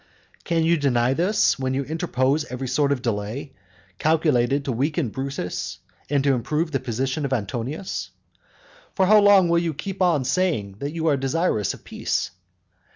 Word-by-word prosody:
VI. - - -32
Can 165 -2 +1
you 170 +1 +3
deny 130 -3 +2
this, 180 +1 +2
when 130 0 -1
you 140 - 0
interpose 150 -2 0
every 130 0 -5
sort 140 +3 +1
of 130 -3 -1
delay 115 +5 -3 0.5
calculated 140 -4 +2
to 135 - -1
weaken 140 +3 0
Brutus, 135 -6 -4 0.3
and 140 -1 +1
to 140 -1 +3
improve 150 +7 -1
the 135 - 0
position 130 +4 -2
of 140 - -2
Antonius? 125 - -3 0.9
For 190 - +3
how 210 +3 +7
long 200 -3 +6
will 170 0 +3
you 165 -3 -2
keep 195 +5 -6
on 170 -7 +3
saying 130 - 0
that 145 +2 -4
you 165 -1 -3
are 150 -3 +3
desirous 135 - 0
of - - -18
peace? - - -2
140 Hz, 170 wpm, -23 LUFS, 130-165 Hz, 0.9 s, how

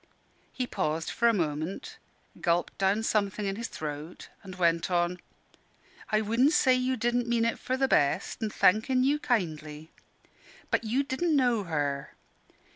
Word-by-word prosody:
He 255 - -3
paused 160 -7 -2
for 235 - +2
a - - +6
moment, 175 - -3 0.4
gulped 170 0 0
down 195 +3 +2
something 205 -1 0
in 195 0 -1
his 230 +2 -4
throat, 150 +2 -7
and 190 -2 -10
went 170 0 +1
on 175 0 0 0.9
"I 215 0 +3
wudn' 230 +6 +3
say 265 -4 +4
you 255 0 0
didn' 240 +1 0
mean 235 -1 +2
it 230 - -1
for 255 +1 -2
the 270 0 +2
best, 140 - +1
an' 220 - -1
thankin' 220 +7 +3
you 285 +3 +2
kindly. 155 - -2 0.8
But - - +1
you 240 +5 0
didn' 300 +4 0
know 245 -7 +2
her. 145 -4 -2
215 Hz, 155 wpm, -28 LUFS, 170-250 Hz, 0.9 s, a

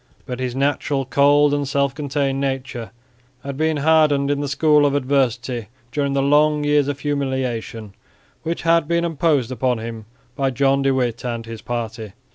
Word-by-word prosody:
But 125 0 -5
his 130 -1 -3
naturally 140 0 0
cold 145 +2 +4
and 145 -1 -1
self 140 0 0
contained 140 -1 -2
nature 130 -4 -3 0.5
had 140 -1 -5
been 155 +1 0
hardened 145 -2 +3
in 145 - 0
the 145 - -2
school 150 +1 +3
of 140 - 0
adversity 125 -4 0 0.2
during 140 0 -1
the 135 0 +1
long 150 +1 +3
years 145 -1 +2
of 145 0 -4
humiliation 130 -7 -3 0.5
which 165 +1 -4
had 165 -2 +3
been 170 +1 +1
imposed 150 -6 +1
upon 130 -1 0
him 110 -1 -7 0.3
by 135 -1 0
John 135 +1 +2
de 135 0 +2
Witt 125 -3 -1
and 115 -2 -4
his 115 -1 -8
party. 115 -4 -5
140 Hz, 170 wpm, -21 LUFS, 125-145 Hz, 0.5 s, cold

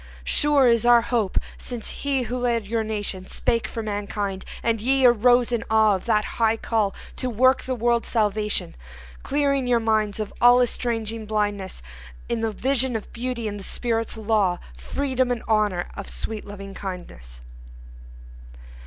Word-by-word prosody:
Sure 290 - +4
is 235 -1 +3
our 240 0 +6
hope 230 -5 -1 0.2
since 240 -3 -5
he 275 -2 0
who 245 +1 -4
led 235 -3 0
your 225 +2 -1
nation 205 -3 -3
Spake 230 -2 0
for 225 - -5
mankind, 205 -2 -3 0.2
and 225 -2 +1
ye 265 +3 +3
arose 245 +1 +5
in 235 -1 0
awe 220 -1 +4
Of 190 - -6
that 215 -2 +2 0.2
high 225 0 +3
call 215 -4 0 0.2
to 255 - -1
work 255 +3 +3
the 260 - -3
world's 235 0 +1
salvation; 210 -2 0 0.5
Clearing 275 -2 0
your 240 -1 +3
minds 215 -2 0
of 215 - -4
all 245 +1 +7
estranging 230 -3 -1
blindness 205 - -2 0.4
In 230 - -2
the 225 - 0
vision 260 +2 0
of 220 - -5
Beauty 240 -1 -3
and 205 -1 -5
the - - -8
Spirit's 230 +1 -2
law, 210 -5 +1 0.2
Freedom 260 - -1
and 245 -2 -2
Honor 210 -5 +1
and 200 - -7
sweet 220 -2 -5
Loving 195 -1 -8
kindness. 120 - -8
225 Hz, 160 wpm, -24 LUFS, 210-245 Hz, 0.5 s, all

